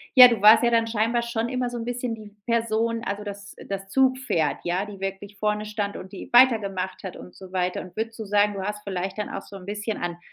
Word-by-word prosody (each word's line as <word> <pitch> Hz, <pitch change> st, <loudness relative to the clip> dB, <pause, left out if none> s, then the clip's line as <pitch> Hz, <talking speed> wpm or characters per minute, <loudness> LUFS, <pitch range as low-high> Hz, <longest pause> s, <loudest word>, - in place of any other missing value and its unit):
ja, 250 Hz, -1 st, +12 dB
du 230 Hz, -4 st, -1 dB
warst 215 Hz, +3 st, +8 dB
ja 240 Hz, -, +4 dB
dann 230 Hz, -1 st, +3 dB
scheinbar 230 Hz, +2 st, +1 dB
schon 235 Hz, -1 st, -2 dB
immer 255 Hz, -1 st, -1 dB
so 240 Hz, -, -5 dB
'n 230 Hz, -, -5 dB
bisschen 245 Hz, -1 st, -3 dB
die 210 Hz, -2 st, -13 dB
Person, 230 Hz, 0 st, 0 dB
also, 205 Hz, -2 st, -3 dB
das 200 Hz, 0 st, -8 dB
das 195 Hz, 0 st, -5 dB
Zugpferd, 260 Hz, -, +1 dB
ja, 180 Hz, +3 st, -1 dB
die 205 Hz, -2 st, -10 dB
wirklich 195 Hz, +1 st, -5 dB
vorne 210 Hz, 0 st, -1 dB
stand 210 Hz, -1 st, -3 dB
und 190 Hz, -, -9 dB
die 195 Hz, -, -9 dB
weitergemacht 200 Hz, -7 st, +3 dB
hat 190 Hz, -, -6 dB
und 180 Hz, -, -12 dB
so 190 Hz, -1 st, -12 dB
weiter 180 Hz, -1 st, -1 dB
und 185 Hz, -, -12 dB
würdest 225 Hz, +1 st, -4 dB
du 220 Hz, -, -4 dB
sagen, 205 Hz, +1 st, +3 dB
du 195 Hz, -, -4 dB
hast 210 Hz, +1 st, -4 dB
vielleicht 190 Hz, 0 st, -4 dB
dann 210 Hz, -, -3 dB
auch -, -, -5 dB
so 200 Hz, -, -12 dB
'n 185 Hz, -, -12 dB
bisschen 210 Hz, +2 st, -3 dB
an 175 Hz, -1 st, -4 dB
210 Hz, 245 wpm, -25 LUFS, 195-230 Hz, -, ja